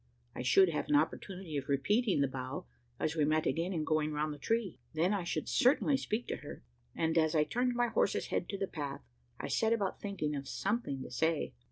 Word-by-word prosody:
I - - -5
should 175 +10 +5
have 160 - -2
an 295 - +4
opportunity 190 - -1
of 140 - -4
repeating 195 - +2
the 140 - +3
bow, 130 +6 -5 0.3
as 155 - 0
we 155 - +2
met 155 +1 +2
again 170 +3 0
in 165 -4 -1
going 155 -1 +1
round 150 0 -1
the 145 - -10
tree. 225 +3 -1 0.2
Then 175 +6 +2
I 200 -3 0
should 160 -2 -2
certainly 275 +2 +4
speak 240 -3 -2
to, - - -2
her; - - -9 0.3
and, 160 0 +2
as 160 0 +2
I 155 - +5
turned 245 +8 0
my 240 0 +2
horse's - - +1
head - - -1
to 200 - -3
the 195 - 0
path, 145 -6 -5 0.4
I - - -3
set 225 0 +2
about 200 -5 -1
thinking 175 -8 -2
of 140 -1 -5
something 195 - -2
to - - -9
say. 160 +4 0
165 Hz, 220 wpm, -33 LUFS, 150-210 Hz, 0.4 s, should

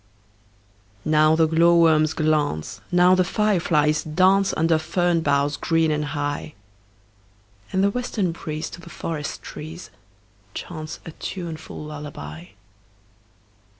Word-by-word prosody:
Now 155 0 +4
the 160 0 +4
glowworms 160 -1 +4
glance, 150 - -1
Now 180 +1 +5
the 185 0 +4
fireflies 170 -7 +1
dance, 190 +5 +3
Under 160 0 +3
fern 175 +1 +1
boughs 140 -1 +1
green 165 -2 +1
and 150 0 -1
high; 145 +1 -3 1.2
And 190 - +1
the 200 - +3
western 220 -6 -1
breeze 155 -1 -5
To 175 - -10
the 170 - -12
forest 155 -4 -5
trees 160 +4 -9 0.6
Chants 155 -2 -7
a 165 - -7
tuneful 165 -2 -7
lullaby. 140 - -8
160 Hz, 115 wpm, -23 LUFS, 150-175 Hz, 1.2 s, Now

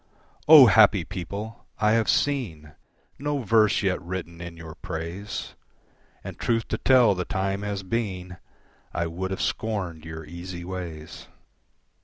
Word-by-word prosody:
O 150 -3 +11
happy 105 -4 +5
people! 100 +5 -7
I 105 0 +2
have 115 -1 +2
seen 85 - -1 0.5
No 145 -1 -2
verse 110 -1 +3
yet 95 -1 0
written 85 -1 -6
in 85 -1 -8
your 80 -1 -9
praise, 90 +3 -6 0.7
And, - - -8
truth 115 -2 0
to - - -2
tell, 125 -5 +5
the 90 -1 -2
time 95 +1 -2
has 100 -1 -4
been 95 -4 -3 0.6
I 85 - 0
would 90 +3 -4
have 95 - -3
scorned 95 -8 -3
your 80 0 -8
easy 85 +2 -8
ways. 85 -4 -7
95 Hz, 140 wpm, -25 LUFS, 85-110 Hz, 0.7 s, O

